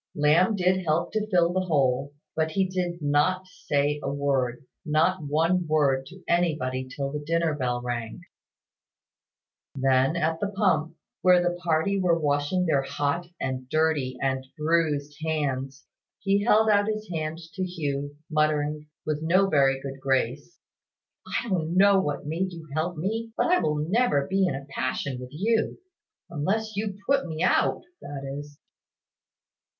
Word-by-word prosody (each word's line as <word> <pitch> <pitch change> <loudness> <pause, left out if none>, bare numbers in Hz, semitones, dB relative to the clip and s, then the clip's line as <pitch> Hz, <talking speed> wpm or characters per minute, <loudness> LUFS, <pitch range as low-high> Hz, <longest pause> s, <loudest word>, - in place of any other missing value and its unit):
Lamb 160 +8 +4
did 185 0 +2
help 165 +1 0
to 215 -1 -1
fill 175 -4 +3
the 185 - +1
hole, 140 -5 +1 0.2
but 160 0 +1
he 195 -1 +2
did 175 -3 -3
not 150 +6 +2
say 150 -5 -1
a 140 - -2
word 135 -3 -1 0.2
not 160 +4 +2
one 165 +4 +1
word 140 -4 +2
to 185 +4 -13
anybody 150 -7 0
till 135 +1 -4
the 150 - -3
dinner 165 +1 +1
bell 125 -4 -2
rang. 120 -2 -4 1.5
Then, 135 +2 +2
at 160 -1 0
the 205 - 0
pump, 170 -6 +1 0.3
where 180 -1 +6
the 175 0 0
party 170 +4 +1
were 175 -3 +3
washing 145 +4 +1
their 150 -5 +2
hot 145 +5 -2
and 130 -1 -3
dirty 155 -5 +1
and 130 -1 0
bruised 150 -2 0
hands, 140 -3 -2 0.3
he 200 0 +1
held 220 0 +4
out 205 -1 +4
his 215 0 -3
hand 155 0 -3 0.2
to 190 - -3
Hugh, 145 -5 -3
muttering, 150 -1 0 0.2
with 155 -1 -1
no 180 +5 +3
very 135 -4 +3
good 135 0 -6
grace 135 +4 -1 0.7
"I 240 - -2
don't 175 -4 -1
know 200 0 +6
what 145 -6 -2
made 175 +5 -2
you 165 -2 -10
help 160 +3 -1
me, 225 +7 -3
but - - +2
I 360 - +5
will 150 - 0
never 155 - +1
be 190 0 +2
in - - -1
a 135 0 -7
passion 130 -1 -3
with 125 0 -8
you; 220 +9 0 0.5
unless 210 +8 -2
you 200 -1 -3
put 275 -5 +2
me 160 -1 -3
out, - - +2 0.2
that 140 -1 -7
is." 145 +1 -7
155 Hz, 155 wpm, -26 LUFS, 140-185 Hz, 1.5 s, where